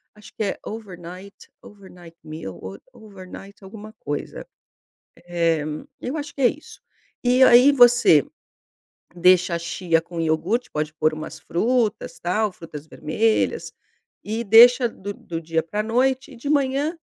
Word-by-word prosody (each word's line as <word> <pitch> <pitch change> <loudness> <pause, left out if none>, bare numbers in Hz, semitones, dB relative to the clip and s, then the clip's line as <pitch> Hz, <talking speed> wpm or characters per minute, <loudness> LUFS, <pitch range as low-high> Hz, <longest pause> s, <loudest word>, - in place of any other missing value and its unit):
acho 210 - -16
que 220 - -3
é 195 - -3
overnight, 190 -2 -9 0.3
overnight 180 -4 -15
meal 155 - -8
ou 95 +1 -9
overnight 200 -2 -13
alguma 215 +2 -11
coisa, 145 0 -6 0.8
eh, 165 -3 0 0.4
eu 265 +5 -4
acho 290 -1 -7
que 275 - -9
é 245 - +6
isso. 300 - -10 0.4
E 250 +1 +3
aí 250 +4 +7
você 245 - +5 0.9
deixa 180 0 +3
a - - -1
chia 170 -1 -1
com 170 0 -7
iogurte, 165 +10 -1
pode 150 0 -3
por 155 0 0
umas 155 +1 -8
frutas, 225 +6 -1
tal, 210 +4 0
frutas 160 -4 -11
vermelhas, 215 +10 -1 0.5
e 220 +2 -3
deixa 240 +3 +7
do 205 -1 -8
do 165 -1 -7
dia 160 0 -1
pra 210 +6 -3
noite 260 +4 0
e - - -13
de 280 +5 -7
manhã 285 +3 0
200 Hz, 145 wpm, -22 LUFS, 165-240 Hz, 0.9 s, aí